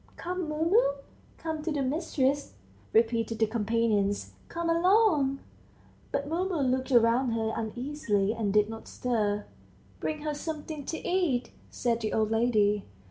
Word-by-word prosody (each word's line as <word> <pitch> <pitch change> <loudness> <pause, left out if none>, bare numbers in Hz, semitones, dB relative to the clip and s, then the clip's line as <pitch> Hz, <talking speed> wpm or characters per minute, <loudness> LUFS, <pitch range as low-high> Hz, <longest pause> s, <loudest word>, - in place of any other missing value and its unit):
"Come, 360 -2 -3
Mumu, 320 - +3 0.4
come 320 -1 -4
to 320 +1 -2
the 290 -2 0
mistress," 280 -1 0 0.4
repeated 225 0 +2
the 220 - +3
companions. 215 -2 0 0.2
"Come 340 0 -3
along!" 335 -5 +3 0.7
But 280 - -1
Mumu 360 +4 -1
looked 260 +1 0
round 240 0 +4
her 220 -1 -1
uneasily, 220 -3 -1
and 220 -3 -1
did 210 0 +4
not 225 0 -8
stir. 210 -4 -1 0.5
"Bring 305 -1 -3
her 305 -1 -1
something 300 -1 -5
to 320 - -4
eat," 345 -9 +1 0.2
said 235 -2 0
the 215 - -2
old 220 -1 +1
lady. 215 -3 +2
255 Hz, 135 wpm, -29 LUFS, 225-310 Hz, 0.7 s, round